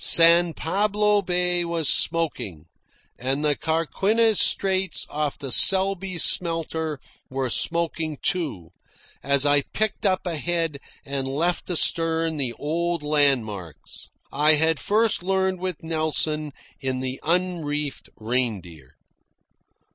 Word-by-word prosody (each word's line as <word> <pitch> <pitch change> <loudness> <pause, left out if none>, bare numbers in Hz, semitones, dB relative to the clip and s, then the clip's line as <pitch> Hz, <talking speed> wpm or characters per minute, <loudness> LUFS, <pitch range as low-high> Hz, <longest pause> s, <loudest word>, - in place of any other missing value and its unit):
San 170 0 +6
Pablo 210 +3 +1
Bay 180 -1 0
was 170 -3 -1
smoking, 145 - 0 0.5
and 135 +4 -2
the 145 -1 +2
Carquinez 195 - +1
Straits 190 -1 0
off 150 -1 -2
the 135 -2 -6
Selby 190 +1 +3
Smelter 160 -3 0 0.3
were 130 -2 -2
smoking, 165 -1 0 1.0
as 140 0 +2
I 145 0 +4
picked 215 +8 -3
up 190 -2 +1
ahead 165 -2 -2 0.3
and 140 -1 -3
left 165 +8 -2
astern 165 -2 +1
the 130 -4 -2
old 170 +3 -2
landmarks 125 - -1 0.2
I 150 +2 +4
had 160 0 +2
first 220 0 +1
learned 190 0 0
with 185 -1 -5
Nelson 155 -1 -1 0.3
in 130 -1 -3
the 130 0 -4
unreefer 160 -4 -2
Reindeer. 105 - -4
160 Hz, 110 wpm, -23 LUFS, 140-180 Hz, 1.0 s, San